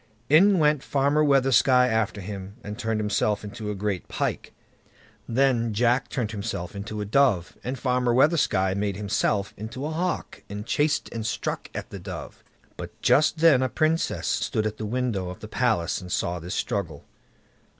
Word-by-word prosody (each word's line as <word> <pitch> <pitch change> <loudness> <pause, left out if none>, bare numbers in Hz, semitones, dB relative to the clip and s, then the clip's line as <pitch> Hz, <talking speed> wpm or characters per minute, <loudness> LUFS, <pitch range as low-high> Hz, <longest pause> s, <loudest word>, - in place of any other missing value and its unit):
In 190 +7 +6
went 150 -3 +3
Farmer 145 +3 +2
Weathersky 135 -3 +4 0.2
after 110 -3 0
him, 100 0 -7
and 105 - -6
turned 110 -2 -2
himself 105 0 0
into 105 +1 -6
a 105 - -2
great 100 -2 -3
pike. - - -3 0.8
Then 120 -3 +2
Jack 120 +3 +2
turned 115 -5 -2
himself 100 -4 -5
into 105 +1 -5
a - - -3
dove, 105 -6 +2
and 130 +2 -3
Farmer 125 -1 +1
Weathersky 125 - +3
made 100 -1 -1
himself 100 -1 0
into 115 +6 -6
a 155 - -3
hawk, 175 +3 -3
and 105 +1 -6
chased 150 +4 +1
and 115 -1 -4
struck 110 - -3
at - - -6
the 100 - -7
dove. 90 -6 -8 0.3
But - - -9
just 155 +2 +4
then 155 -6 +6
a 130 - +1
Princess 155 - 0
stood 110 +6 0
at 110 0 -2
the 110 - -4
window 115 -6 -1
of 90 - -8
the 110 - -8
palace 110 -7 0
and 90 -1 -9
saw 90 0 -1
this 85 +2 -5
struggle. 100 - -3
110 Hz, 170 wpm, -25 LUFS, 100-135 Hz, 0.8 s, In